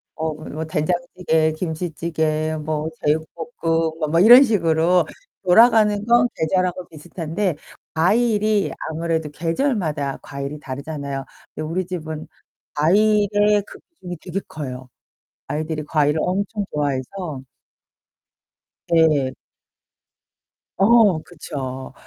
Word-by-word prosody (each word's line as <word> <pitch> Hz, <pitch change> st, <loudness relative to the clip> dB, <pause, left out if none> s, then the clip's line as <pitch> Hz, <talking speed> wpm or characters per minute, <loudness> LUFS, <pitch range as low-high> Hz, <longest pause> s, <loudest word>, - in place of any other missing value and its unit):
어 160 Hz, -1 st, -2 dB
뭐 155 Hz, +1 st, -6 dB
된장찌개, 160 Hz, 0 st, 0 dB
김치찌개, 160 Hz, -1 st, -2 dB
뭐 155 Hz, 0 st, -2 dB, 0.2 s
제육볶음 160 Hz, +1 st, -1 dB
뭐, 155 Hz, -, 0 dB
뭐 165 Hz, +2 st, +3 dB
이런 240 Hz, +8 st, +9 dB
식으로 170 Hz, -, +2 dB, 0.4 s
돌아가는 210 Hz, +1 st, +5 dB
건 240 Hz, +1 st, +4 dB
계절하고 185 Hz, +2 st, -1 dB
비슷한데 165 Hz, +3 st, -3 dB, 0.4 s
과일이 210 Hz, +4 st, +2 dB, 0.2 s
아무래도 160 Hz, -1 st, -2 dB
계절마다 165 Hz, -, -1 dB
과일이 140 Hz, +1 st, -6 dB
다르잖아요. 140 Hz, 0 st, -5 dB, 0.3 s
근데 155 Hz, -, -5 dB
우리 185 Hz, +3 st, -1 dB
집은 160 Hz, -3 st, -6 dB, 0.5 s
과일의 205 Hz, +4 st, +3 dB
그 -, -, -12 dB
비중이 180 Hz, -, -9 dB
되게 185 Hz, +1 st, -3 dB
커요. 130 Hz, -4 st, -7 dB, 0.6 s
아이들이 155 Hz, 0 st, -3 dB
과일을 150 Hz, 0 st, +1 dB
엄청 200 Hz, +3 st, -1 dB
좋아해서 145 Hz, +2 st, -3 dB, 1.5 s
네. 155 Hz, -5 st, +3 dB, 1.5 s
어, 205 Hz, -4 st, +5 dB
그쵸. 135 Hz, -6 st, -7 dB
165 Hz, 240 characters per minute, -21 LUFS, 155-190 Hz, 1.5 s, 이런